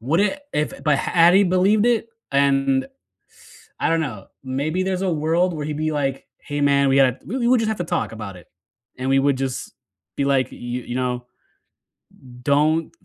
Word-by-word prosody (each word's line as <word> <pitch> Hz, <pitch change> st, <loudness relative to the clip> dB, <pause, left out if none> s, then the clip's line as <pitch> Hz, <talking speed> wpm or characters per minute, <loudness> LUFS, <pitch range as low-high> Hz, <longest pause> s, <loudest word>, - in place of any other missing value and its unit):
Would 150 Hz, -, +1 dB
it 285 Hz, +8 st, 0 dB
if 150 Hz, -, -1 dB
but 150 Hz, -2 st, +3 dB
had 170 Hz, +4 st, +4 dB
he 200 Hz, -, +6 dB
believed 195 Hz, +4 st, +3 dB
it, 230 Hz, -1 st, +1 dB, 0.2 s
and 135 Hz, -1 st, +2 dB, 0.9 s
I -, -, +1 dB
don't 165 Hz, 0 st, +2 dB
know, 120 Hz, -11 st, -5 dB, 0.2 s
maybe 145 Hz, +8 st, -1 dB
there's 190 Hz, -1 st, -2 dB
a 190 Hz, -2 st, 0 dB
world 165 Hz, +4 st, +1 dB
where 150 Hz, -2 st, -4 dB
he'd 150 Hz, 0 st, -3 dB
be 155 Hz, 0 st, -1 dB
like, 135 Hz, -2 st, -2 dB
"Hey, 145 Hz, 0 st, -5 dB
man, 140 Hz, -1 st, +3 dB
we 135 Hz, -, +3 dB
gotta 135 Hz, -2 st, +3 dB
we 250 Hz, +7 st, -4 dB
we 240 Hz, -2 st, 0 dB
we 255 Hz, 0 st, +5 dB
just 225 Hz, -1 st, 0 dB
have 220 Hz, -, -1 dB
to 175 Hz, -, -2 dB
talk 160 Hz, -, -2 dB
about 100 Hz, -4 st, -7 dB
it," 90 Hz, -, -16 dB, 0.5 s
and 130 Hz, +1 st, -2 dB
we 135 Hz, 0 st, +4 dB
would 140 Hz, -1 st, +2 dB
just 130 Hz, -5 st, -4 dB, 0.4 s
be 140 Hz, -, -1 dB
like, 135 Hz, -2 st, +2 dB
"You -, -, -11 dB, 0.3 s
you 120 Hz, -, -6 dB
know, 125 Hz, -1 st, -2 dB, 1.2 s
don't" 150 Hz, +4 st, +2 dB
145 Hz, 200 wpm, -22 LUFS, 135-180 Hz, 1.2 s, he